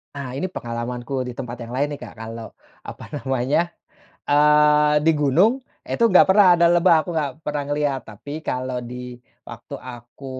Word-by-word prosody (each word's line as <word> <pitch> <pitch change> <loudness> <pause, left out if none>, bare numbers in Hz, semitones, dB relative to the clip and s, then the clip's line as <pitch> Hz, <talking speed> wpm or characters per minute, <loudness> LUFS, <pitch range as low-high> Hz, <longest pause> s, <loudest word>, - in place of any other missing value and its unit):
Ah, 140 -3 -6
ini 185 - -2
pengalamanku 125 -2 -5
di 125 - -7
tempat 120 0 -7
yang 120 - -9
lain 140 +3 +1
nih 145 - -6
Kak - - -10
kalau 115 0 -8 0.4
apa - - -9 0.2
namanya, 135 +6 -1 0.6
eee, 150 0 +4
di 160 - +4
gunung 175 - +3 0.2
itu 235 - -1
nggak 185 -5 +6
pernah 195 0 +6
ada 170 0 +4
lebah 175 0 +5
aku 175 - -7
gak 150 -3 0
pernah 150 -1 -3
ngeliat, 145 -2 -1
tapi 110 +6 -10
kalau 130 0 -2
di 125 0 -8 0.2
waktu 120 +4 -10
aku 125 0 -11
140 Hz, 165 wpm, -22 LUFS, 125-150 Hz, 0.6 s, nggak